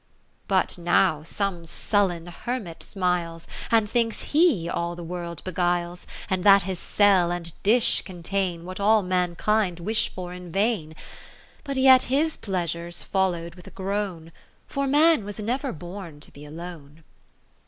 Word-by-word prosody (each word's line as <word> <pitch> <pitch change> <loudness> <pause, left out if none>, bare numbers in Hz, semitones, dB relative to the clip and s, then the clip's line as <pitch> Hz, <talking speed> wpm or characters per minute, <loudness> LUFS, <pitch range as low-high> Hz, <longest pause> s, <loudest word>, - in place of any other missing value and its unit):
VIII - - -40
But 190 -3 +1
now 175 -2 +2
some 180 +1 -3
sullen 175 0 0
Hermit 180 0 -5
smiles. 175 -3 -2 0.2
And 225 -2 +3
thinks 230 0 -1
he 295 - +4
all 170 0 -2
the 175 - -8
world 170 0 -5
be 185 - -5
guiles, 175 0 -1 0.2
And 185 -1 -1
that 200 -2 +7
his 185 -1 -4
cell 195 -4 +3
and 170 -2 -4
dish 230 +4 +5
contain 180 -1 -3
What 185 +1 -7
all 210 +1 +4
mankind 180 +1 0
wish 215 +6 +2
for 180 -1 -7
in 180 -1 -9
vain. 195 -5 0 0.7
But 275 -2 -4
yet 260 -1 +6
his 305 +4 +1
pleasure 170 -3 -3
's 175 - -4
follow'd 175 -3 -1
with 180 -1 -15
a - - -8
groan. 190 -4 -4 0.3
For 275 0 -2
man 300 -1 +4
was 205 0 -7
never 250 +6 -2
bcjn 175 -1 -9
to - - -12
be 145 +1 -12
alone. 160 -1 -10
185 Hz, 155 wpm, -25 LUFS, 170-210 Hz, 0.7 s, that